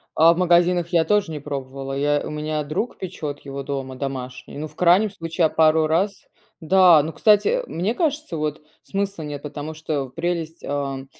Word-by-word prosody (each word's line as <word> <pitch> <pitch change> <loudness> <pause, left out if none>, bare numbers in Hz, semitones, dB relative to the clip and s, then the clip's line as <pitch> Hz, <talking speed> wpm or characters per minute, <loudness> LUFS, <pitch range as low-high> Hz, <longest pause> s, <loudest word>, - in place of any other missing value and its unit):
А 165 +2 +6
в - - -7
магазинах 175 -1 +3
я 170 -2 +3
тоже 205 -1 +1
не 150 - -4
пробовала, 135 -1 -5
я 145 +1 +1
у - - -5
меня 150 0 -2
друг 155 +11 -3
печёт 155 -6 -5
его 140 0 -6
дома, 135 -1 -4
домашний, 130 -1 -6
ну, 155 +2 -4
в - - -20
крайнем 185 +4 +4
случае 165 -2 -1
я - - +3
пару 155 0 +3
раз 190 +5 0 0.3
Да! 175 -2 +6
Ну, 160 +2 -5
кстати, 210 -2 +4
э, - - 0
мне 185 +7 -1
кажется, 300 - -1
вот 150 0 -3 0.2
смысла 195 -3 -3
нет, 145 -1 -6
потому 150 +1 -6
что 150 -4 -3
прелесть, 165 +2 -3
а, 140 -2 -3
160 Hz, 190 wpm, -22 LUFS, 145-180 Hz, 0.3 s, А